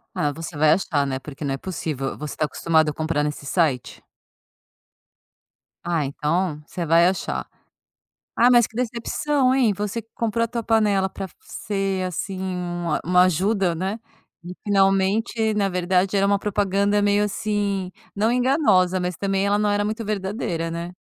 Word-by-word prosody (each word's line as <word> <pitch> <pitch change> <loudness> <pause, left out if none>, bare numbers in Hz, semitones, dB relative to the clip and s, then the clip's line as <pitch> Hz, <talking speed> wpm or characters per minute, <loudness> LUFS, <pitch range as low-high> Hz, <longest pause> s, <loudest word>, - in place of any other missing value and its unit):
Ah, 145 - +1
você 160 +1 -7
vai 150 0 +5
achar, 155 -5 +1
né, 130 -1 -2
porque 140 +2 -11
não 135 -1 -1
é - - -2
possível. 150 -5 -4
Você 150 -1 -6
tá - - 0
acostumado 155 +1 +2
a - - -4
comprar 155 -1 -1
nesse 150 -1 -4
site? 145 -6 0 1.8
Ah, 165 -4 0
então, 150 +3 -1
você 170 +2 -5
vai 165 +2 +5
achar. 190 0 -3 0.9
Ah, 240 +2 +5
mas 240 -2 +6
que - - -24
decepção, 255 +3 0
hein? 235 -6 +3
Você 210 +2 -3
comprou 230 0 -1
a 230 - -4
tua 235 -1 -3
panela 210 -4 +2
para 190 0 -6
ser, 195 -2 -3
assim, 185 +2 -4
uma 175 -3 -2
uma 180 +1 +5
ajuda, 185 +1 +1
né. 190 +6 -3 0.4
E 175 - -7
finalmente, 200 +3 +2
na 200 -2 +1
verdade, 180 +2 +1
era 195 0 +3
uma 200 0 +2
propaganda 200 0 +1
meio, 205 0 +3
assim, 205 -3 -2 0.2
não 220 +4 +2
enganosa, 245 - +3
mas 180 -1 -3
também 195 +1 0
ela 205 +1 +2
não 210 0 +1
era 205 0 +1
muito 220 +2 -3
verdadeira, 190 -5 -2
né? 170 +1 -5
190 Hz, 160 wpm, -23 LUFS, 165-210 Hz, 1.8 s, mas